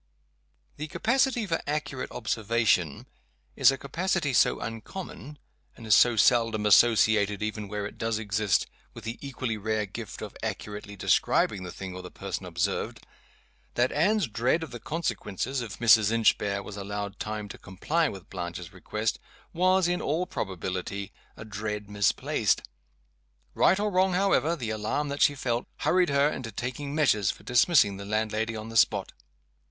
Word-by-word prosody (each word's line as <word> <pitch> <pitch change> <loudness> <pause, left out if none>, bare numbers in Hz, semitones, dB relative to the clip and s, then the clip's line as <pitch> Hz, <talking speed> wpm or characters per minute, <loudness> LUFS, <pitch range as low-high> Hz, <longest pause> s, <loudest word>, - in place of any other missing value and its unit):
The 150 - -4
capacity 250 - +1
for 165 -4 -1
accurate 145 -3 -3
observation 110 - 0 0.5
is - - +6
a 135 - -3
capacity 160 +1 -1
so - - +4
uncommon, 145 - -7 0.4
and 115 - -10
is 110 - +4
so 120 +3 +6
seldom 115 -1 +3
associated, 105 -1 +4
even 105 -1 -3
where 105 0 -4
it 105 - -8
does 115 -1 0
exist, 105 -2 +1 0.3
with - - -9
the 115 +1 -5
equally 130 -5 -3
rare 110 0 -1
gift 95 - -8
of - - -8
accurately 105 0 -5
describing 100 0 +2
the 90 -1 -6
thing 95 0 -7
or 90 - -7
the 90 - -9
person - - -5
observed, - - -2 0.7
that 120 +1 +2
Anne's 200 +8 +2
dread 125 +8 0
of 160 - -8
the 120 - -7
consequences 135 - -3
if 115 - -6
Mrs. 110 -2 +5
Inchbare 105 -3 +2
was 105 0 -8
allowed 100 0 -5
time 105 -1 -4
to - - -9
comply 150 - -1
with 95 -3 -10
Blanches 90 -1 -6
request, 105 +4 -2 0.3
was, 185 +1 +3
in 175 0 0
all 160 +5 0
probability, 95 - -4 0.2
a 110 - -9
dread 105 -1 -5
misplaced. 100 -1 +1 0.9
Right 190 - +4
or 210 0 0
wrong, 185 0 +3
however, 180 -3 +2
the 120 -8 -4
alarm 110 +7 -2
that 140 +1 -4
she 145 - +5
felt 120 -3 -2
hurried 180 -1 +3
her 140 0 +3
into 125 -6 -4
taking 130 +6 -4
measures 110 -11 +3
for - - -5
dismissing 120 - +4
the 100 - -7
landlady 110 +1 -1
on 110 +1 -6
the 115 - -2
spot. 105 -2 +3
115 Hz, 160 wpm, -27 LUFS, 105-145 Hz, 0.9 s, is